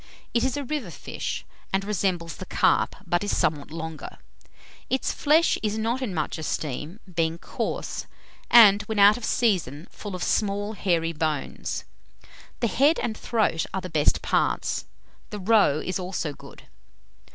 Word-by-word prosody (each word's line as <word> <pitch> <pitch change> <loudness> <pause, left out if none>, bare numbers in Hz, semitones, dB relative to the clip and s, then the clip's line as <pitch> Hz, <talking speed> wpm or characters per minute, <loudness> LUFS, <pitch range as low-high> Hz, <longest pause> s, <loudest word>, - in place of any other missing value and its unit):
It 235 - +2
is 265 +1 0
a 285 - -2
river 275 -7 -3
fish, 165 - -5 0.3
and 195 +1 0
resembles 180 -5 -1
the - - -8
carp, - - +2
but 175 +2 0
is 205 - 0
somewhat 150 -2 0
longer. 160 -1 -7 0.7
Its 265 - 0
flesh 310 +3 +3
is 215 0 -1
not 230 +4 -1
in 250 -6 -2
much 160 -2 -2
esteem, 155 - -4
being 165 0 0
coarse, - - -4 0.4
and, 210 -4 +8
when 220 - -3
out 205 +1 +7
of 245 - -8
season, 180 - 0
full 205 -3 -7
of 180 - -4
small 205 0 0
hairy 170 -5 0
bones. 155 -2 -3 0.8
The 235 - +3
head 280 - +3
and 220 - -2
throat 215 -8 0
are 190 - -1
the 185 - -7
best 150 -2 +2
parts. - - 0 0.4
The 210 - -5
roe 200 -7 +4
is 185 0 -2
also 180 -4 -3
good. - - -14
195 Hz, 155 wpm, -25 LUFS, 165-220 Hz, 0.8 s, and